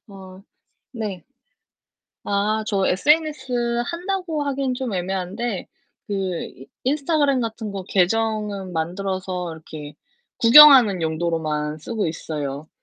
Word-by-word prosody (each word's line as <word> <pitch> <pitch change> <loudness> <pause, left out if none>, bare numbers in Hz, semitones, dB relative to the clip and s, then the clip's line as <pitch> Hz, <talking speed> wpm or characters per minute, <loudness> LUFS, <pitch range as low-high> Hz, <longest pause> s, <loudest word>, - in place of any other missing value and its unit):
어 190 -1 -12 0.5
네. 210 -7 -5 1.0
아, 210 +2 0
저 195 -3 0
SNS 260 - +1
한다고 350 -2 -3
하기는 275 -2 -1
좀 250 -3 -4
애매한데 190 +4 -3 0.4
그 205 - -3
이 180 -8 -4 0.2
인스타그램 285 0 +1
같은 225 -2 -4
거 195 - -5
계정은 205 0 0
만들어서 180 +1 -3
이렇게 155 -2 -10 0.4
구경하는 240 -6 +8
용도로만 160 -2 -2
쓰고 215 +6 -3
있어요. 150 -2 -5
200 Hz, 240 characters per minute, -22 LUFS, 180-250 Hz, 1.0 s, 구경하는